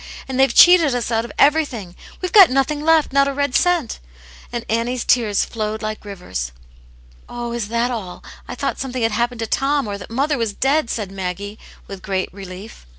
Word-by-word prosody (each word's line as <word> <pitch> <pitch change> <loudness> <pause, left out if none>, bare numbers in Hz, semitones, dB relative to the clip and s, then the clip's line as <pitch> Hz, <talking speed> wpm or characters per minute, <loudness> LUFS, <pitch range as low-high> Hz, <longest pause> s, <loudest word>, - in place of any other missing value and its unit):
And 265 -1 -3
they've 270 0 +4
cheated 340 -7 +6
us 240 -1 -2
out 225 0 0
of - - -9
everything. 270 - +1 0.3
We've 365 - -2
got 390 -5 +8
nothing 275 +3 0
left, 320 -3 +3
not 275 0 +4
a 280 - -2
red 285 -1 -1
cent." 345 -7 +1 0.3
* - - -20
And 235 -1 -4
Annie's 230 +2 -1
tears 220 -5 +2
flowed 215 -1 -4
like 215 0 -4
rivers. 180 - -6 0.4
" - - -27
Oh, 240 0 -5
is 235 -3 -3
that 235 +3 0
all? 200 -7 -6 0.2
I - - -6
thought - - -3
something 255 -2 -3
had 225 - +2
hap 235 +2 +1
pened 245 - -11
to 225 - -3
Tom, 275 +2 0
or 200 -1 -5
that 185 - -10
mother 275 +4 0
was 225 -3 -1
dead," 270 +2 +1
said 210 -5 -4
Maggie, 195 +2 -5 0.3
with 195 -1 -9
great 190 -1 -3
relief. 195 - -10
230 Hz, 210 wpm, -20 LUFS, 200-270 Hz, 0.4 s, got